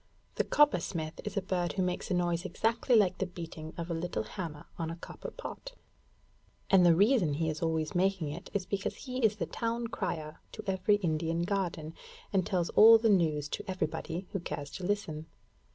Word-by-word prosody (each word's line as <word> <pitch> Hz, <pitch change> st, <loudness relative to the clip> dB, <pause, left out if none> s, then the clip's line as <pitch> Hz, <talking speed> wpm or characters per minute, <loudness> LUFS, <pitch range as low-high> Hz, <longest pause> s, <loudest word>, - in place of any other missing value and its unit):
The -, -, +1 dB
Coppersmith 170 Hz, -, +1 dB
is 210 Hz, -1 st, -5 dB
a 200 Hz, -, +1 dB
bird 180 Hz, -2 st, -1 dB
who 190 Hz, -, 0 dB
makes 180 Hz, 0 st, -2 dB
a 185 Hz, -, +1 dB
noise 175 Hz, -1 st, 0 dB
exactly 230 Hz, +2 st, +1 dB
like 190 Hz, -4 st, +4 dB
the 190 Hz, -, 0 dB
beating 165 Hz, -3 st, -7 dB
of 170 Hz, 0 st, -4 dB
a -, -, +1 dB
little 165 Hz, -9 st, -2 dB
hammer 150 Hz, -, -6 dB
on 165 Hz, -1 st, -2 dB
a 165 Hz, -, -4 dB
copper 170 Hz, -, -8 dB
pot; -, -, -8 dB, 1.0 s
and 190 Hz, -2 st, +7 dB
the 170 Hz, -2 st, +6 dB
reason 200 Hz, -, +4 dB
he 160 Hz, +1 st, 0 dB
is 155 Hz, -, -6 dB
always 160 Hz, -2 st, 0 dB
making 185 Hz, -3 st, +1 dB
it 155 Hz, +4 st, -7 dB
is 195 Hz, -2 st, -1 dB
because 195 Hz, -1 st, -2 dB
he 255 Hz, -1 st, -5 dB
is 215 Hz, -2 st, +4 dB
the 210 Hz, -, -2 dB
town 230 Hz, 0 st, -2 dB
crier 160 Hz, -8 st, -4 dB
to -, -, -7 dB
every 190 Hz, +1 st, +2 dB
Indian 165 Hz, -3 st, 0 dB
garden, 175 Hz, -5 st, -2 dB, 0.4 s
and 190 Hz, -3 st, +2 dB
tells 175 Hz, -3 st, 0 dB
all 225 Hz, +1 st, +9 dB
the 225 Hz, 0 st, +2 dB
news 155 Hz, -7 st, +2 dB
to 205 Hz, -, -4 dB
everybody 175 Hz, 0 st, -3 dB
who 195 Hz, -, -2 dB
cares 145 Hz, -4 st, -5 dB
to 190 Hz, -, -7 dB
listen. 175 Hz, -6 st, -2 dB
180 Hz, 195 wpm, -31 LUFS, 160-200 Hz, 1.0 s, all